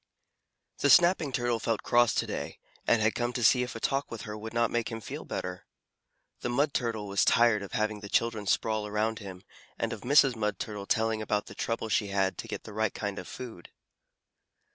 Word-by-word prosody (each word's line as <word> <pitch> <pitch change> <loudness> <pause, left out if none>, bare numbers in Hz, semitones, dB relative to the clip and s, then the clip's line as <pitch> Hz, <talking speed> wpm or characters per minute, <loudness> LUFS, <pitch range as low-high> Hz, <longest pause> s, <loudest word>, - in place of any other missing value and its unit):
The 140 - +3
Snapping 175 -3 +5
Turtle 120 -2 0
felt 115 -2 -1
cross 120 -1 +4
to - - +1
day, - - -5 0.3
and 110 -2 +4
had 110 - +3
come 120 0 -1
to 120 - -2
see 125 +3 +5
if 125 -1 -4
a - - -5
talk 135 +4 -1
with 115 - -7
her 105 - -6
would 110 +1 -7
not 115 0 +1
make 120 -1 -1
him 115 - -5
feel - - -7
better. - - -5 0.7
The - - -3
Mud 140 +4 +1
Turtle 115 -4 -2
was 100 0 +2
tired 115 -3 +4
of 100 - -8
having 110 -1 0
the 100 -1 -9
children 110 -2 0
sprawl 110 +1 +1
around 110 +1 -1
him, 95 -3 -9 0.3
and - - -1
of - - -8
Mrs. 135 -1 +5
Mud 105 -2 -1
Turtle 105 -2 -5
telling 110 -1 +1
about 105 -1 -1
the - - -10
trouble 115 -1 -2
she 105 -1 +1
had 95 -1 0
to - - -5
get - - -5
the 105 - -10
right 110 -1 0
kind 100 -2 -3
of - - -8
food. 115 -9 -9
110 Hz, 215 wpm, -29 LUFS, 105-120 Hz, 0.7 s, Snapping